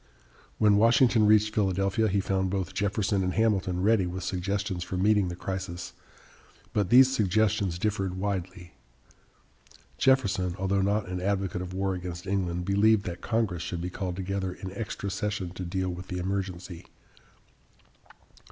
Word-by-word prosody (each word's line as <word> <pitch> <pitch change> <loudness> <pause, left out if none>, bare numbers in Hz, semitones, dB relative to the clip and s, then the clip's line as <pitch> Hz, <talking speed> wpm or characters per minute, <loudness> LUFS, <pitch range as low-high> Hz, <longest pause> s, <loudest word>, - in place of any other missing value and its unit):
When 105 -1 +4
Washington 115 0 +4
reached 105 0 +4
Philadelphia, 100 +1 +1
he 100 -1 +1
found 95 -1 0
both 95 -1 -3
Jefferson 100 0 0
and 90 0 -1
Hamilton 95 -5 +1
ready 105 -3 +3
with 90 +1 -5
suggestions 95 0 -2
for 90 - -5
meeting 100 0 +3
the 85 - -4
crisis, 90 -1 -5 0.8
but 100 -4 0
these 130 +2 +6
suggestions 100 -4 +1
differed 95 -2 -1
widely. 90 -2 -4 1.3
Jefferson, 100 -9 +2
although 95 +1 0
not 100 +1 0
an 90 0 -4
advocate 95 -2 -1
of 90 0 -6
war 95 0 0
against 90 -1 -6
England, 90 -3 -1
believed 100 +2 +3
that 85 -1 -5
Congress 110 -7 -1
should 85 0 -4
be 90 +1 -4
called 90 -1 -4
together 95 0 -3
in 95 +1 -8
extra 100 -1 -4
session 100 -2 -3
to 90 0 -6
deal 95 +1 -2
with 90 +1 -7
the 90 - -4
emergency. 90 -1 -4
95 Hz, 150 wpm, -28 LUFS, 90-105 Hz, 1.3 s, these